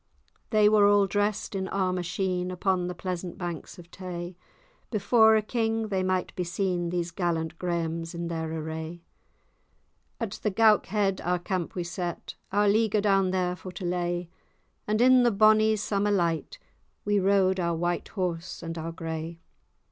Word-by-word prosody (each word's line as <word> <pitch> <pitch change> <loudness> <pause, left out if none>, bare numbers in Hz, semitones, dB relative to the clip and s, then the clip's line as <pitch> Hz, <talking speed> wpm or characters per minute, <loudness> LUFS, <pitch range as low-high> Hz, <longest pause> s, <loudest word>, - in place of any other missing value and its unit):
They 215 -1 +4
were 210 -1 +5
all 205 -1 +5
drest 205 +1 -1
in 190 -1 -2
armour 185 -2 0
sheen, 180 0 -2
Upon 185 0 0
the 180 - -5
pleasant 180 -1 -5
banks 175 0 -6
of 170 -1 -14
Tay; 180 -1 -6 0.5
Before 220 +1 +4
a 215 - +2
king 225 -1 -1
they 190 -2 0
might 185 -1 -1
be 180 - -1
seen, 175 -1 -1
These 175 -1 -2
gallant 165 -2 -2
Grahams 170 -1 -2
in 170 0 -3
their 160 -1 -3
array. 160 +1 -5 1.2
At 220 -3 -4
the 210 - +1
Goukhead 205 -2 +3
our 180 +1 +1
camp 175 -1 -3
we 180 - -2
set, 175 0 -5 0.2
Our 205 +1 +3
leaguer 215 0 +3
down 195 -2 +3
there 180 -1 0
for 180 +2 -9
to 180 - -6
lay; 175 -1 -2 0.6
And, 215 +2 +1
in 255 0 +6
the 240 - +4
bonny 215 +1 +5
summer 205 -1 0
light, 175 - 0 0.5
We 205 0 +2
rode 190 -1 +3
our 170 -1 0
white 175 +1 -1
horse 180 -3 -4
and 165 0 -5
our 165 +1 -4
gray. 165 0 -5
185 Hz, 165 wpm, -27 LUFS, 170-205 Hz, 1.2 s, in